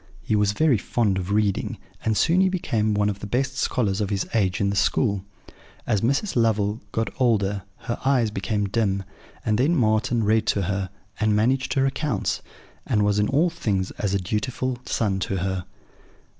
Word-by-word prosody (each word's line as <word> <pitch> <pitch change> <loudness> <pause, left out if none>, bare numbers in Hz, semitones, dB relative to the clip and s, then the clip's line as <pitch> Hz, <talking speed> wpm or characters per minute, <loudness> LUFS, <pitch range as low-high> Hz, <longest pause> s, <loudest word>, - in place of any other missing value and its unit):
He 110 - 0
was 105 -1 +2
very 145 -4 +3
fond 100 -1 0
of 90 0 -5
reading; 105 -2 0 0.3
and 110 -2 +1
soon 170 +3 +4
he 190 - +4
became 110 - 0
one 105 0 +2
of 100 -1 -2
the 105 - -6
best 130 +5 -1
scholars 110 -6 0
of 100 - -1
his 100 -2 -1
age 95 -5 +1
in 100 -1 +1
the - - -2
school. 100 -2 +1 0.6
As 105 -5 +1
Mrs. 140 - 0
Lovel 110 -2 +1
got 110 0 -1
older, 105 -5 +2 0.2
her 120 -1 -2
eyes 130 -5 +2
became 105 0 -1
dim; 100 -2 0 0.4
and 110 0 +1
then 150 +7 +3
Marten 110 -2 +2
read 110 +1 +2
to 100 - +1
her, 95 0 -2 0.3
and 110 -1 +2
managed 130 +5 +1
her 135 -1 +3
accounts, 135 -5 -1 0.5
and 105 -1 +2
was 105 0 +2
in 105 - +2
all 160 +6 +2
things 100 - -1
as 100 -1 0
a - - +1
dutiful 120 +6 -2
son 100 -4 0
to 95 +1 -2
her. 95 0 -2
105 Hz, 185 wpm, -24 LUFS, 100-125 Hz, 0.6 s, soon